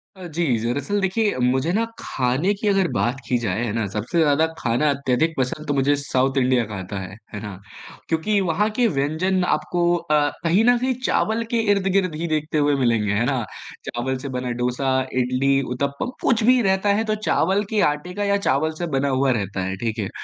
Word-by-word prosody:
अ, 185 -1 -10
जी 170 +1 -2
दरअसल 140 - -1
देखिए, 205 +3 +1
मुझे 130 +6 +1
ना 225 - +2 0.2
खाने 135 +10 0
की 215 - 0
अगर 195 -2 +3
बात 120 +3 0
की 125 - +2
जाए 110 -1 -2
हैं 110 - -3
ना, 115 -2 -1
सबसे 115 +11 -1
ज़्यादा 155 0 +4
खाना 120 +6 +1
अत्यधिक 140 +3 +1
पसंद 135 +4 -2
तो 145 - +1
मुझे 140 +1 +2
साउथ 135 0 0
इंडिया 130 -2 +3
का - - -4
आता 95 +1 -5
है, 95 +1 -8 0.2
हैं 105 - -5
ना, 100 -4 -7 0.5
क्योंकि 180 +6 +1
वहाँ 210 +7 +1
के 245 - +5
व्यंजन 170 +7 +1
आपको 175 +3 -2
अ, 150 -3 +1
कहीं 175 +6 +3
न 245 0 +5
कहीं 255 +2 0
चावल 220 +1 +1
के 235 - +2
इर्द-गिर्द 190 -4 0
ही 170 +2 -3
देखते 155 0 -1
हुए 145 -1 +3
मिलेंगे, 115 -6 +1
हैं 110 +3 +1
ना? 130 -2 0 0.4
चावल 130 +2 -2
से 140 +2 -6
बना 125 -1 -3
डोसा, 130 +2 0 0.2
इडली, 130 +2 +2
उत्तप्पम 140 - -3
कुछ 230 -3 +2
भी 250 +2 +5
रहता 190 -1 +1
है, 215 +2 +1
तो 215 -1 -1
चावल 190 +5 +2
के 215 -2 +1
आटे 150 +5 -8
का 205 +2 -2
या 200 0 +2
चावल 140 +4 +1
से 175 - -1
बना 140 +1 +1
हुआ 135 0 +2
रहता 100 -5 -2
है 95 +1 -3
ठीक 115 +2 -3
है, 100 -3 -2
145 Hz, 210 wpm, -22 LUFS, 125-185 Hz, 0.5 s, के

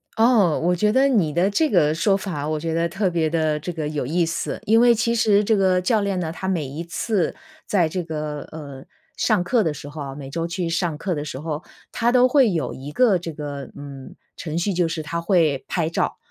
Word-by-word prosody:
哦， 220 -8 +4
我 180 +1 +2
觉 210 +4 +2
得 265 +4 +4
你 200 - +2
的 175 +4 +2
这 310 +9 +1
个 155 -7 +3
说 195 +4 +2
法 165 -7 -4
我 155 - -1
觉 165 +1 -3
得 170 +1 0
特 195 +3 -1
别 165 -2 0
的 155 -2 0
这 165 +4 -5
个 160 -3 -4
有 150 -1 -2
意 170 +5 +1
思。 165 +1 -3
因 225 +2 +5
为 240 -1 +6
其 230 +1 +1
实 210 -3 +3
这 220 +1 +2
个 185 -2 +3
教 215 +4 +1
练 200 -2 -1
呢， 160 -2 -2
他 190 +3 -6
每 175 -6 0
一 145 +5 -6
次 180 +3 -1 0.3
在 180 -6 +2
这 180 +3 -3
个， 150 -2 -5
呃， 140 -4 -9 0.3
上 175 - +2
课 230 +5 +2
的 160 -3 0
时 145 - -9
候 150 +1 -8
啊 135 -1 -6
每 135 -1 -8
周 165 +3 -2
去 170 0 -3
上 165 -2 -1
课 185 +2 -2
的 145 -2 -3
时 130 -3 -6
候， 155 +1 -4 0.3
他 240 0 +1
都 250 0 +5
会 255 -3 +4
有 160 -9 -2
一 135 +3 -8
个 200 +2 +3
这 170 -1 -6
个， 145 -2 -6
嗯， 140 -2 -10 0.2
程 160 -1 -5
序， 185 +3 0
就 175 -1 +1
是 165 -1 -4
他 170 +3 -3
会 165 -7 +2
拍 165 -3 -1
照。 165 - -1
170 Hz, 255 characters per minute, -22 LUFS, 150-195 Hz, 0.3 s, 为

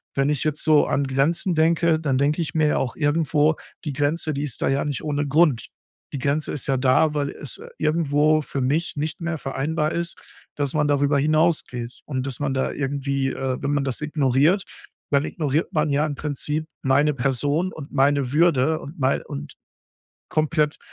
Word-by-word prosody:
wenn 135 +1 +2
ich 150 -2 0
jetzt 155 -1 -1
so 155 -2 +4
an 140 - +1
Grenzen 160 +6 +1
denke, 165 0 +3
dann 140 -5 0
denke 145 +4 +1
ich 160 - -3
mir 155 -1 +3
ja - - +1
auch 125 -3 -2
irgendwo: 150 0 +2 0.3
„Die 145 - -2
Grenze, 150 +3 0
die 140 - -2
ist 140 -5 -5
da - - +2
ja 140 +2 +1
nicht 145 -3 -3
ohne 145 -1 -1
Grund.“ 145 -6 +3 0.5
Die 140 - -3
Grenze 145 +3 0
ist 145 - -3
ja 135 -1 +2
da, 140 +4 +3
weil 145 -1 -1
es 145 - -8 0.2
irgendwo 155 -1 +2
für 140 -1 -4
mich 150 +7 0
nicht 155 +2 -3
mehr 170 -1 -2
vereinbar 150 +3 -2
ist, 170 0 -3 0.4
dass 145 -2 -1
man 150 -1 +2
darüber 145 0 +2
hinausgeht 150 -6 0
und 130 -3 -3
dass 130 - -5
man 145 -2 -1
da 130 0 0
irgendwie, 140 -1 -1
äh, 130 -1 -2
wenn 145 - -1
man 145 -1 +1
das 130 -3 -2
ignoriert, 150 +5 +2 0.5
dann 140 0 +3
ignoriert 155 -1 -1
man 155 -1 +1
ja 145 +2 +2
im 150 - -2
Prinzip 150 +2 -3 0.2
meine 145 +3 +3
Person 145 +7 0
und 150 -2 -9
meine 140 -1 +2
Würde 155 -2 +3
und 150 +4 -10
mei 130 0 +1
und 70 +1 -7 0.8
komplett, 155 -1 +1
145 Hz, 190 wpm, -23 LUFS, 135-155 Hz, 0.8 s, so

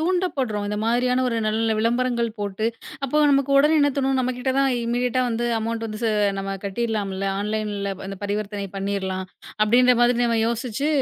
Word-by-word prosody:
தூண்டபடுறோம். 315 - 0
இந்த 210 - -2
மாதிரியான 250 +2 +2
ஒரு 235 - -2
நல்ல - - +2
நல்ல 225 0 +2
விளம்பரங்கள் 235 +1 +1
போட்டு 205 +2 -2 0.4
அப்போ 275 +2 -1
நமக்கு 275 0 +2
உடனே 300 +3 +5
என்ன 285 - +4
தோணும், 270 -1 +1
நம்மகிட்ட 255 0 -1
தான் 275 0 +3
இம்மீடியட்டா 245 +2 0
வந்து 235 0 -1
அமௌன்ட் 225 +1 -3
வந்து 215 -1 -6 0.4
நம்ம 195 0 -3
ச - - -7
கட்டிரலாம்ல! 200 -2 -2 0.2
ஆன்லைன்ல 210 -1 -2
அந்தப் 195 0 -7
பரிவர்த்தனை 205 0 -3
பண்ணிரலாம் 195 -1 -2 0.4
அப்படின்னுற 250 +4 +5
மாதிரி 240 -1 +3
யோசிச்சு, 235 +4 -2
230 Hz, 160 wpm, -23 LUFS, 205-250 Hz, 0.4 s, உடனே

